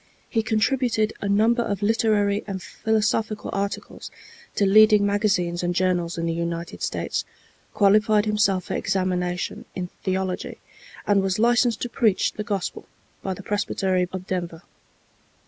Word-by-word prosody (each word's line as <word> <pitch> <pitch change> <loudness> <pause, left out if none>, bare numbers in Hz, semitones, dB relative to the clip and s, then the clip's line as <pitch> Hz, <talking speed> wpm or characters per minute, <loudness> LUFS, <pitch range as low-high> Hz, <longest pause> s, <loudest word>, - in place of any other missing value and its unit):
He 225 - 0
contributed 220 0 +1
a 200 - -2
number 225 +4 +3
of 205 -3 -2
literary 210 -2 +2
and 195 -2 -4
philosophical 215 +2 -1
articles 200 0 -4 0.5
to 200 - +2
leading 210 +1 +6
magazines 195 -4 +1
and 175 0 -1
journals 180 -2 0
in 165 - -2
the 165 - 0
United 170 0 -4
States, - - -2 0.5
qualified 210 +1 +4
himself 210 -3 +1
for - - -5
examination 180 -2 -1
in 180 -1 -4
theology, 190 -1 -2 0.5
and 200 -1 +3
was 190 -1 0
licensed 240 +1 +2
to - - -1
preach 220 -5 +1
the 210 - -4
Gospel 200 -4 -4 0.3
by 190 -1 -3
the 200 - -10
Presbytery 190 -3 0
of 185 -1 -6
Denver. 175 -3 -4
200 Hz, 140 wpm, -24 LUFS, 185-215 Hz, 0.5 s, leading